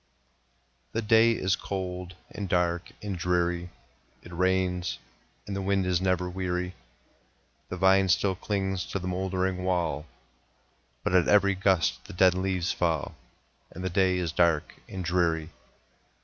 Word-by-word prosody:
The 115 - -1
day 115 +1 +5
is 95 -4 +1
cold, 90 -2 -5 0.2
and 100 -3 -5
dark, 85 -1 +1
and 100 -2 -3
dreary; 90 0 0 0.5
It 85 - -11
rains, 90 0 0 0.5
and 100 - -4
the 100 - -2
wind 95 0 +1
is 90 -1 +1
never 90 -1 +1
weary; 90 0 -2 1.0
The 90 - -4
vine 95 +1 +4
still 95 +2 +3
clings 95 -1 -2
to - - -3
the 90 -1 -5
moldering 95 0 -1
wall, 85 -5 -1 1.0
But - - -1
at 90 -2 +4
every 100 -1 +5
gust 95 -4 +1
the - - -10
dead 90 0 +5
leaves 95 -1 -1
fall, 80 -5 -1 0.6
And 90 - -8
the 95 - -2
day 95 0 +3
is 90 -3 -1
dark 85 -3 +2 0.2
and 95 -2 -5
dreary. 85 -2 +1
90 Hz, 145 wpm, -28 LUFS, 90-95 Hz, 1.0 s, day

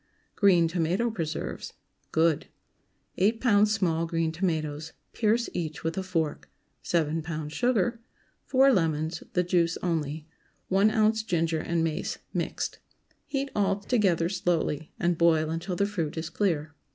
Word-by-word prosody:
GREEN 180 -5 +5
TOMATO 180 +7 0
PRESERVES. 165 -7 -4 0.4
(Good.) 160 -1 +2 0.7
8 215 +5 +3
lbs. 210 -4 +4
small 170 -6 +1
green 165 -1 0
tomatoes. 160 -3 -2 0.2
Pierce 230 +1 +2
each 160 -3 -4
with 165 0 -1
a 190 - -1
fork. 160 - -2 0.3
7 160 -1 0
lbs. 155 -1 -5
sugar. 240 +1 +1 0.5
4 270 0 +5
lemons—the 165 0 0
juice 175 -1 +1
only. 155 -3 -2 0.4
1 195 +3 +4
oz. 220 0 +2
ginger 165 -6 0
and 165 +1 0
mace 160 -2 -2 0.2
mixed. - - -3 0.5
Heat 275 -1 -2
all 200 -1 +1
together 195 -7 +2
slowly, 170 -4 -1
and 170 -1 +1
boil 160 -2 +3
until 170 +3 -3
the 200 - +2
fruit 170 -7 -3
is 160 +1 -4
clear. 160 -5 0
170 Hz, 135 wpm, -27 LUFS, 160-200 Hz, 0.7 s, GREEN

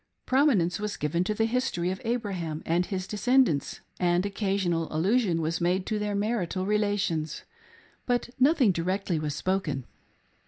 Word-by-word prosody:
Prominence 245 - +3
was 210 0 -3
given 150 +4 0
to 215 - -1
the 225 - +2
history 225 -7 0
of 190 - -5
Abraham 195 -10 -3
and 175 +2 +1
his 185 -3 -3
descendants, 220 - +1 0.2
and 175 +1 +2
occasional 195 -5 -1
allusion 180 +1 +2
was 160 +2 -1
made 180 +2 +1
to 215 -1 -1
their 210 -1 -2
marital 200 -3 -1
relations; 205 -7 0 0.6
but 245 -1 0
nothing 265 -5 +5
directly 180 0 -1
was 150 -1 -3
spoken. 150 -6 -1
190 Hz, 145 wpm, -27 LUFS, 170-215 Hz, 0.6 s, nothing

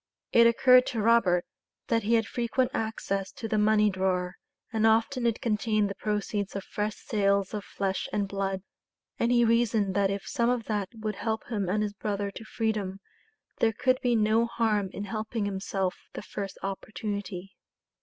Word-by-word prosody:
It 235 0 +7
occurred 250 +2 +6
to 235 - -2
Robert 205 -6 +4 0.4
that 230 -1 +2
he 225 +3 +2
had 225 -1 +2
frequent 240 +3 0
access 195 -3 -2
to 225 - -5
the 215 0 +1
money 210 0 +4
drawer, 185 -1 0 0.4
and 220 0 +3
often 230 +3 +2
it 230 - -1
contained 215 -3 +1
the 200 - -9
proceeds 210 -1 -2
of 195 - -3
fresh 210 0 -3
sales 200 -2 0
of 210 -1 -3
flesh 195 -1 -2
and 205 -1 0
blood; 195 -1 -2 0.6
and 235 - +2
he 240 -1 +5
reasoned 225 -4 +2
that 200 0 +2
if 195 0 -3
some 240 -4 +1
of 245 -2 0
that 205 -3 -2
would 215 -2 -4
help 220 -1 -2
him 205 -6 -1
and 210 +3 +1
his 205 -1 -3
brother 200 -1 -3
to 225 - -9
freedom, 215 -4 -2 0.6
there 225 -1 +3
could 255 +3 +2
be 245 -2 +2
no 220 +1 +3
harm 215 -4 0
in 200 - -5
helping 215 +1 -3
himself 195 -1 -1 0.2
the - - -6
first 195 -2 -6
opportunity. 195 -1 -5
210 Hz, 175 wpm, -28 LUFS, 195-230 Hz, 0.6 s, It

